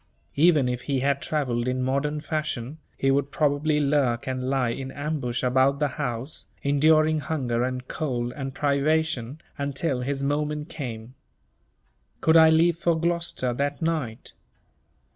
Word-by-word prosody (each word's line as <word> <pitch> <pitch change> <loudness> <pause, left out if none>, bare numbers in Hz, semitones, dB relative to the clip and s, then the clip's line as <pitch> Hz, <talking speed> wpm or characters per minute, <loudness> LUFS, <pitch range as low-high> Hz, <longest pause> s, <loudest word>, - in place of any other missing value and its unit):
Even 155 -4 +4
if 125 0 -2
he 135 -2 +1
had 140 0 +1
travelled 125 -6 -1
in 130 0 0
modern 145 +3 -1
fashion, 155 -3 -3 0.2
he 135 - +2
would 140 0 +1
probably 150 +1 +1
lurk 140 -5 +1
and 130 0 -2
lie 130 -3 +1
in 135 +2 -5
ambush 145 -5 -3
about 130 +2 +3
the 150 -1 +1
house, 130 0 -4 0.2
enduring 155 +2 +4
hunger 130 -6 -1
and 130 0 -3
cold 125 -5 -2
and 135 -2 -5
privation, 145 -2 0 0.2
until 140 -1 -1
his 135 +2 -2
moment 150 +2 -1
came. 120 -4 -6 1.1
Could 160 - +3
I 160 -1 +8
leave 165 +1 +4
for 170 -1 +1
Gloucester 170 -7 -1
that 140 +3 -2
night? 150 -9 -2
140 Hz, 145 wpm, -25 LUFS, 130-155 Hz, 1.1 s, I